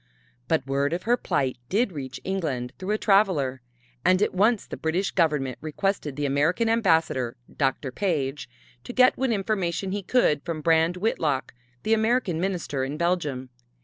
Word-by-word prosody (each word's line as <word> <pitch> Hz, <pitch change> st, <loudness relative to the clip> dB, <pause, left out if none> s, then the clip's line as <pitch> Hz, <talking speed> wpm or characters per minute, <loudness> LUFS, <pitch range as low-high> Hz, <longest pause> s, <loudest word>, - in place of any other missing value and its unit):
But 155 Hz, -3 st, +1 dB
word 140 Hz, +2 st, 0 dB
of 175 Hz, -, -3 dB
her 240 Hz, +2 st, +3 dB
plight 130 Hz, -, -1 dB
did 215 Hz, +2 st, +1 dB
reach 135 Hz, -5 st, -6 dB
England 145 Hz, -10 st, -2 dB
through 185 Hz, +2 st, -5 dB
a 215 Hz, -, +2 dB
traveler, 185 Hz, -, +2 dB, 0.4 s
and 185 Hz, 0 st, +4 dB
at 210 Hz, -, +1 dB
once 210 Hz, +4 st, +2 dB
the -, -, -7 dB
British 175 Hz, +5 st, -1 dB
Government 150 Hz, -7 st, 0 dB
requested 155 Hz, -2 st, -2 dB
the 145 Hz, +1 st, -2 dB
American 150 Hz, +11 st, +1 dB
Ambassador, 160 Hz, -, +1 dB, 0.2 s
Dr. 135 Hz, -1 st, 0 dB
Page, 145 Hz, -6 st, -2 dB, 0.3 s
to -, -, -7 dB
get 255 Hz, 0 st, +5 dB
what 265 Hz, 0 st, 0 dB
information 195 Hz, -3 st, -1 dB
he 205 Hz, +1 st, -2 dB
could 185 Hz, -, +2 dB
from 165 Hz, -3 st, -4 dB
Brand 165 Hz, +2 st, +3 dB
Whitlock, 160 Hz, -9 st, -1 dB, 0.3 s
the 220 Hz, -, +2 dB
American 220 Hz, -6 st, +1 dB
Minister 175 Hz, -8 st, -2 dB
in 140 Hz, +3 st, -3 dB
Belgium. 150 Hz, -7 st, -1 dB
170 Hz, 160 wpm, -25 LUFS, 140-200 Hz, 0.4 s, get